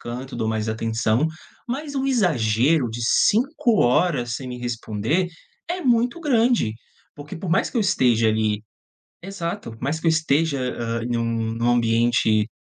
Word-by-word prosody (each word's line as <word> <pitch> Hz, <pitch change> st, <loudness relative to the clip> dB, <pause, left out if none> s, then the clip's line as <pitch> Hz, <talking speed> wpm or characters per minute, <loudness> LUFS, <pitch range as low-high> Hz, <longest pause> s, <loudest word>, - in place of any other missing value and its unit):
canto, 125 Hz, +3 st, -7 dB
dou 110 Hz, -2 st, -2 dB
mais 110 Hz, -1 st, -1 dB
atenção. 110 Hz, +4 st, 0 dB, 0.4 s
Mas 285 Hz, +3 st, -4 dB
o 270 Hz, 0 st, -1 dB
exagero 140 Hz, -, +2 dB
de 120 Hz, +1 st, -5 dB
5 235 Hz, -, +2 dB
horas 125 Hz, -2 st, +2 dB
sem 130 Hz, -2 st, -7 dB
me 125 Hz, 0 st, -6 dB
responder 120 Hz, -, -2 dB, 0.4 s
é 360 Hz, +1 st, -3 dB
muito 245 Hz, +3 st, +2 dB
grande, 235 Hz, -, +2 dB, 0.4 s
porque 145 Hz, +1 st, -9 dB
por 175 Hz, +1 st, -5 dB
mais 170 Hz, -, +2 dB
que -, -, -7 dB
eu 225 Hz, -, +3 dB
esteja 120 Hz, -, +3 dB
ali 110 Hz, -1 st, 0 dB, 0.6 s
exato, 170 Hz, -, -5 dB
mais 145 Hz, +5 st, -1 dB
que -, -, -8 dB
eu -, -, +5 dB
esteja, 160 Hz, -2 st, +1 dB, 0.2 s
hã, 115 Hz, 0 st, -2 dB
em 120 Hz, 0 st, -1 dB
um 115 Hz, -1 st, -2 dB
num 120 Hz, +1 st, +1 dB
ambiente 115 Hz, -2 st, +2 dB
125 Hz, 155 wpm, -23 LUFS, 115-185 Hz, 0.6 s, eu